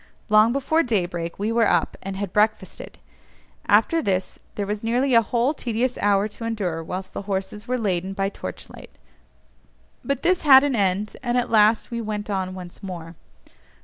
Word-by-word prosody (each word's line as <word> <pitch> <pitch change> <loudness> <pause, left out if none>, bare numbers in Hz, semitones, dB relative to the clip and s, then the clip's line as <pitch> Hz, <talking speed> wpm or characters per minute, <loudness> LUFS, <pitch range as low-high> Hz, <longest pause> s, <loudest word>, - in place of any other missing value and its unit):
Long 215 +2 +5
before 275 +5 +1
daybreak 175 - -2
we 210 +3 -1
were 230 0 +3
up, 175 -2 +1
and 195 0 -6
had 200 -2 -4
breakfasted; 215 -2 -1 0.7
after 330 -1 +3
this 190 -7 -2 0.2
there 205 - -2
was 210 +1 -3
nearly 245 +4 +1
a 230 - +7
whole 240 +5 0
tedious 245 -2 -2
hour 200 0 +2
to 215 +2 -10
endure 195 -8 -2
whilst 185 +3 -6
the - - -4
horses 195 +2 -4
were 255 +1 0
laden 190 -4 -2
by 195 0 -1
torch 95 - -8
light; - - -14 1.1
but 275 +1 -2
this 360 +1 +2
had 270 -3 +8
an 285 -3 0
end, 200 0 0
and 245 -1 -1
at 245 - -1
last 220 +1 +3
we 235 0 -3
went 210 -1 -4
on 185 -1 -2
once 180 0 -10
more. 170 -4 -7
210 Hz, 180 wpm, -23 LUFS, 190-235 Hz, 1.1 s, had